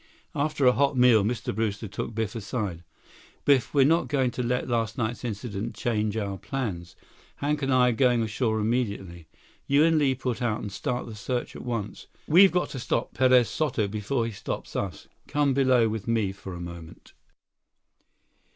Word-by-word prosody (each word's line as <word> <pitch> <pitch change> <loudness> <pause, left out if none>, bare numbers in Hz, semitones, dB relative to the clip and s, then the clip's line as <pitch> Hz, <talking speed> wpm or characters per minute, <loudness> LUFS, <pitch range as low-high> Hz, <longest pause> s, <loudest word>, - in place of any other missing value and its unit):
After 145 -2 0
a 125 - +8
hot 140 +1 +1
meal, 125 -4 +6
Mr. 110 +2 -2
Brewster 110 0 -2
took 110 +3 -5
Biff 110 -2 -2
aside. 100 -6 -4 0.6
"Biff, 135 -6 +3
we're 140 -2 +4
not 165 +4 +3
going 130 -4 +1
to 125 - -4
let 125 +1 -1
last 115 -3 -1
night's 120 0 -2
incident 110 -1 -4
change 110 -2 -1
our 100 -3 -3
plans. 95 -10 -4 0.4
Hank 150 +1 -1
and 135 0 0
I 125 -1 +5
are - - +2
going 120 0 +3
ashore 110 0 -1
immediately. 100 -7 -2 0.4
You 140 +2 +4
and 165 -1 +4
Li 135 -3 +2
put 125 -1 -3
out 115 -3 0
and 105 - -6
start 125 +3 -3
the 115 - -8
search 120 +4 -4
at - - -7
once. 115 -4 -5 0.2
We've 185 +5 +7
got 180 0 0
to 135 - -6
stop 120 0 -2
Perez 130 -2 +4
Soto 125 -9 -1
before 110 +4 -2
he 115 - -3
stops 100 - -6
us. 95 -5 -4 0.2
Come 145 -2 +1
below 130 -3 +4
with 110 -1 -4
me 110 -4 +1
for 95 -1 -9
a - - -7
moment." 85 -2 -10
120 Hz, 180 wpm, -26 LUFS, 105-130 Hz, 0.6 s, a